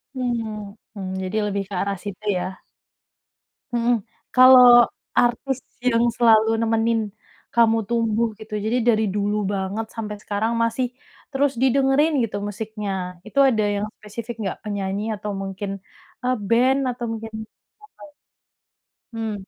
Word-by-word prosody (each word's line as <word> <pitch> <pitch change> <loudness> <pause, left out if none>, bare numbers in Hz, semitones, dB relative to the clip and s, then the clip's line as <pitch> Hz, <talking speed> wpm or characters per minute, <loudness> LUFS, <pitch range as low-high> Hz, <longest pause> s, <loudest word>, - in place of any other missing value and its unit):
Mmm, 225 -5 -3 0.2
mmm, 190 -3 -6
jadi 190 +3 -3
lebih 200 0 -1
ke - - -8
arah 200 0 -2
situ, 205 0 -7 0.2
ya. 185 +1 -5 1.1
Mhm. 240 0 +2 0.4
Kalau 250 -2 +8 0.3
artis 250 +2 +1 0.2
yang 240 -2 +2
selalu 225 -1 +4
nemenin 225 0 +1 0.5
Kamu 225 -2 +3
tumbuh, 230 0 0
gitu, 215 0 -7
jadi 220 +4 0
dari 220 -2 +3
dulu 205 0 0
banget 195 +3 -2
sampai 210 -2 -5
sekarang 215 +3 -2
masih 230 +2 0 0.4
terus 280 0 +1
didengerin 270 +4 +3
gitu 205 -2 -5
musiknya. 205 -4 -5
Itu 220 +8 -3
ada 235 -5 +3
yang 200 +1 -1 0.2
spesifik 225 +2 -7
enggak? 190 - -3
Penyanyi 200 -1 -2
atau 210 0 -5
mungkin, 195 +1 -5 0.5
eee, 255 0 +2
band 255 +4 +4
atau 240 -1 -4
mungkin, 225 0 -6 1.6
atau - - -47
mmm. 225 -1 -3
225 Hz, 130 wpm, -22 LUFS, 205-240 Hz, 1.6 s, Kalau